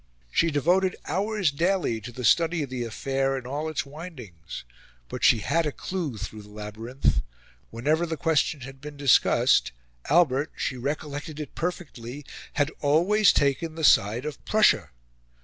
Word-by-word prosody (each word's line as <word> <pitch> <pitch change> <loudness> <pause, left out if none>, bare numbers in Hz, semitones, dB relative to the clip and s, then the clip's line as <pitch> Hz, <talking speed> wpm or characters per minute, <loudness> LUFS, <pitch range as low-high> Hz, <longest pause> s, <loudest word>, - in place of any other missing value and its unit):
She 165 - +3
devoted 175 +6 +2
hours 200 -3 0
daily 170 - 0
to 120 - -8
the 125 +2 -7
study 165 +5 +3
of 135 - -7
the 125 -2 -2
affair 135 +4 -1
in 130 - -7
all 145 +5 -3
its 155 - -2
windings; 135 - -9 0.5
but - - -6
she 115 - +5
had 165 +6 +1
a - - -1
clue 165 - -4
through 105 +1 -7
the 105 - -15
labyrinth: 105 - -2 0.5
whenever 150 +9 0
the 160 -1 -3
question 150 -1 +1
had 135 +1 -10
been 150 -1 -9
discussed, 140 -3 +4 0.4
Albert, 150 -3 +3
she 130 - -2
recollected 145 +3 -4
it 150 - -6
perfectly, 145 -6 -5 0.3
had 145 0 +1
always 180 +8 +4
taken 145 +3 0
the 160 - -5
side 115 0 +4
of 150 -2 -6
Prussia. 210 - +3
145 Hz, 155 wpm, -26 LUFS, 125-165 Hz, 0.5 s, she